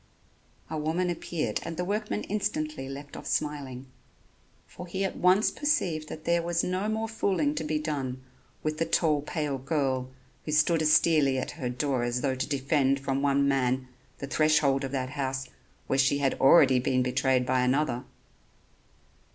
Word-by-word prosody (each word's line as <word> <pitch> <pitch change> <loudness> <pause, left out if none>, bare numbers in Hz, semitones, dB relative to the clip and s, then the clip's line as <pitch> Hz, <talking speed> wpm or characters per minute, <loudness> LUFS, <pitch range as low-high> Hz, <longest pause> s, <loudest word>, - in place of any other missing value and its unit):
A 155 - -4
woman 170 +4 0
appeared 155 -9 -3
and 165 -1 -6
the 180 - -1
workman 210 +2 -2
instantly 155 -9 -3
left 140 +1 -8
off - - -8
smiling, 140 -4 -2 0.8
for 180 - -10
he 190 +3 -2
at 190 - -3
once 185 +4 +3
perceived 180 - 0
that 155 - -8
there 170 0 +2
was 170 0 0
no 185 +3 -1
more 220 +1 -1
fooling 190 -9 0
to 160 - -3
be 155 0 -1
done 140 -4 -3 0.4
with 155 0 -2
the 165 - +2
tall 155 -4 +2
pale 150 -2 -3
girl 130 -2 -1 0.3
who 150 - -4
stood 155 +2 +3
austerely 155 -3 +4
at 130 - -3
her 130 -6 -4
door 130 +1 -1
as 120 +1 -1
though 135 -2 0
to 130 0 -3
defend 140 -1 +1
from 135 0 -2
one 140 0 +2
man 130 -1 0 0.3
the - - -5
threshold 150 -1 +2
of 135 - -4
that 130 -2 -2
house 135 -2 -3 0.4
where 135 - 0
she 135 +1 +3
had 140 -2 +1
already 135 -2 +6
been 130 0 +1
betrayed 130 0 +1
by 130 0 +1
another. 125 -1 +1
145 Hz, 170 wpm, -28 LUFS, 130-165 Hz, 0.8 s, already